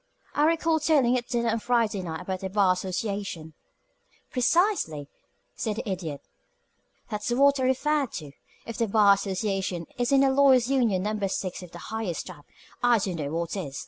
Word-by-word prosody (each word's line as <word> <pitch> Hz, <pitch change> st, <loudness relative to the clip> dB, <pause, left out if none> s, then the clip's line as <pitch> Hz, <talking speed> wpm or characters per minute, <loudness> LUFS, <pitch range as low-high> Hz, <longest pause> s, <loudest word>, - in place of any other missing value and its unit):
"I 295 Hz, -, +3 dB
recall 325 Hz, 0 st, +2 dB
telling 280 Hz, -5 st, +3 dB
at 240 Hz, -1 st, -2 dB
dinner 235 Hz, -1 st, 0 dB
on 230 Hz, +1 st, 0 dB
Friday 225 Hz, -4 st, +1 dB
night 160 Hz, -3 st, -5 dB
about 190 Hz, -1 st, -4 dB
the 190 Hz, -, -4 dB
Bar 195 Hz, -2 st, +3 dB
Association 185 Hz, -3 st, -4 dB, 0.4 s
" -, -, -38 dB
"Precisely," 255 Hz, -, +1 dB, 0.5 s
said 215 Hz, -2 st, -3 dB
the 235 Hz, +2 st, -5 dB
Idiot. 170 Hz, -7 st, -4 dB, 0.9 s
"That's 210 Hz, +1 st, -3 dB
what 280 Hz, +3 st, +4 dB
I -, -, 0 dB
referred 280 Hz, +1 st, +1 dB
to. 150 Hz, -4 st, -6 dB, 0.3 s
If 230 Hz, -, -7 dB
the 230 Hz, -, +1 dB
Bar 205 Hz, -1 st, +5 dB
Association 195 Hz, -3 st, -2 dB
isn't 270 Hz, +3 st, +3 dB
a 270 Hz, -, +4 dB
Lawyer's 265 Hz, -2 st, +4 dB
Union 230 Hz, -9 st, +2 dB
Number 210 Hz, -1 st, -1 dB
Six 185 Hz, -1 st, -4 dB
of 180 Hz, -, -10 dB
the 170 Hz, -, -11 dB, 0.2 s
highest 220 Hz, -7 st, -3 dB
type, 165 Hz, -6 st, -11 dB, 0.4 s
I 245 Hz, -1 st, +4 dB
don't 190 Hz, -4 st, -2 dB
know 145 Hz, -3 st, -3 dB
what 170 Hz, +2 st, -2 dB
is. 140 Hz, -9 st, -5 dB
210 Hz, 175 wpm, -26 LUFS, 185-255 Hz, 0.9 s, Bar